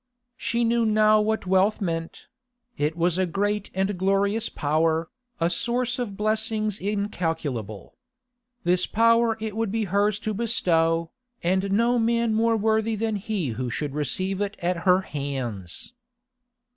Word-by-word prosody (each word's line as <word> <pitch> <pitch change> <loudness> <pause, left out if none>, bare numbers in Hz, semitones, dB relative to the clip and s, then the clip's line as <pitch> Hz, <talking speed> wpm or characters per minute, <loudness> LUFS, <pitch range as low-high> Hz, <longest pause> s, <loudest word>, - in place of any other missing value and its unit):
She 235 -2 -1
knew 235 0 +2
now 215 -1 +4
what 220 -1 -1
wealth 190 +3 +3
meant; 165 -3 -4 0.5
it 150 +3 -1
was 175 +1 +1
a 185 - +2
great 205 +3 -1
and 190 0 -1
glorious 200 +4 +1
power, 160 +2 0 0.3
a 165 - +2
source 245 +7 -1
of 205 -5 -4
blessings 215 -1 0
incalculable. 165 - -3 0.7
This 180 +1 +2
power 230 0 +3
it 215 -1 -4
would 225 -2 -1
be 225 0 0
hers 200 +2 +1
to 215 - -2
bestow, 170 -7 +1 0.3
and 190 +3 +1
no 235 +4 +3
man 230 0 +1
more 225 +1 +2
worthy 220 +1 +1
than 220 0 -1
he 195 -7 -2
who 125 +2 -3
should 145 +4 -3
receive 185 +6 -2
it 205 0 -2
at 175 +1 -1
her 180 +1 +5
hands. 130 - -5
200 Hz, 145 wpm, -25 LUFS, 170-220 Hz, 0.7 s, her